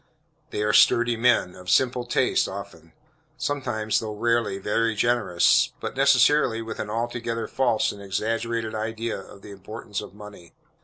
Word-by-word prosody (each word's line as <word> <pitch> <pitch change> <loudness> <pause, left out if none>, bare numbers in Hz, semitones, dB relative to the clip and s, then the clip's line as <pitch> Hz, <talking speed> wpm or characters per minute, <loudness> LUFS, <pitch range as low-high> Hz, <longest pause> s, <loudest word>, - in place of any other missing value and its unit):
They 105 - -2
are 105 0 +1
sturdy 120 +2 +5
men, 115 -6 +2
of 90 0 -10
simple 125 +2 +2
tastes - - +1
often. - - -9 0.4
Sometimes, 120 -7 -1
though 110 -1 -5
rarely, 115 -2 0
very 110 +3 0
generous, 110 -6 +2
but - - -5
necessarily 135 -2 +4
with 115 -1 -6
an 105 - -4
altogether 115 0 -3
false 120 -5 +1
and 100 - -11
exaggerated 115 +3 -2
idea 110 +1 -3
of 100 0 -15
the - - -10
importance 100 +1 -7
of - - -11
money. 105 -5 -13
115 Hz, 150 wpm, -24 LUFS, 105-120 Hz, 0.4 s, sturdy